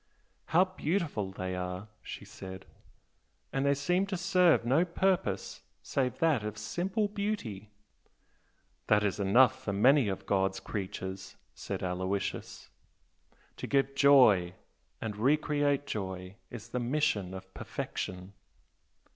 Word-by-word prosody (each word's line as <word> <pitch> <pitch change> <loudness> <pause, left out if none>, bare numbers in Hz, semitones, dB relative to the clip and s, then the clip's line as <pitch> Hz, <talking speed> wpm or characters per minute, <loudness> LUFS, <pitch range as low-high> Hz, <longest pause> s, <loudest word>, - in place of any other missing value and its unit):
"How 180 +4 +4
beautiful 165 - -2
they 95 -1 -4
are!" 90 +2 -4
she - - -8
said 95 0 -9 0.9
"And 135 - 0
they 140 - +4
seem 180 +7 +1
to 190 -1 -2
serve 180 -7 +4
no 135 +8 +4
purpose 180 +1 -1 0.2
save 130 -2 -1
that 155 -9 +2
of 105 0 -5
simple 185 - -1
beauty!" 200 - -4 1.2
"That 105 0 +4
is 105 0 0
enough 130 +6 +4
for 100 - -2
many 130 +5 +5
of 95 -1 -3
God's 95 -1 +1
creatures" 95 -1 -5 0.2
said - - -5
Aloysius 95 +2 -3 0.9
"To - - -5
give 135 0 +1
joy 125 -11 +5 0.4
and 105 -2 -4
re 135 +8 +4
create 145 -2 0
joy 95 -6 -5 0.2
is 115 -3 -9
the 125 - -2
mission 120 -8 0
of 95 - -10
perfection." 90 +1 -5
115 Hz, 125 wpm, -30 LUFS, 95-150 Hz, 1.2 s, many